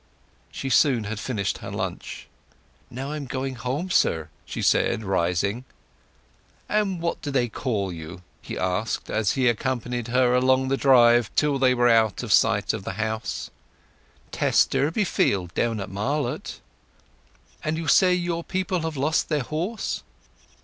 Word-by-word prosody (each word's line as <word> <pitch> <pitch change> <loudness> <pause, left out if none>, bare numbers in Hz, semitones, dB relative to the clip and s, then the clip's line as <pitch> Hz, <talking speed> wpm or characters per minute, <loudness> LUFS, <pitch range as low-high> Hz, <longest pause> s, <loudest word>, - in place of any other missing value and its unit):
She 135 - -5
soon 130 -7 +4
had 105 +1 -4
finished 105 -6 -2
her - - -7
lunch. - - -5 0.6
"Now 135 +3 -5
I 155 - -3
am 140 -3 -6
going 130 +1 -3
home, 135 +8 -3
sir," 80 - +2 0.2
she - - -4
said, 110 - +2
rising. 95 +4 0 1.0
"And 205 -4 0
what 170 0 -2
do 145 - -4
they 130 -3 +1
call 110 -6 -2
you?" 85 +3 -9 0.2
he - - -6
asked, 95 +4 -2
as 110 -3 +1
he 130 -2 +1
accompanied 120 0 -1
her 125 +1 +3
along 130 +1 +3
the 135 - +2
drive 120 -4 +5
till 145 -2 +2
they 130 -1 +4
were 120 0 +3
out 110 -4 +3
of - - +1
sight - - +3
of - - -5
the 95 - -4
house. 110 +2 -3 0.8
"Tess - - +3
Durbeyfield, 140 - 0
down 115 -2 0
at 95 0 -6
Marlott." 135 +10 -3 1.0
"And 155 +1 -1
you 165 -1 -4
say 180 +6 +5
your 175 -1 -2
people 185 0 -2
have 160 -2 -4
lost 150 +4 +1
their 150 -4 0
horse?" 175 - -3
125 Hz, 155 wpm, -24 LUFS, 110-150 Hz, 1.0 s, drive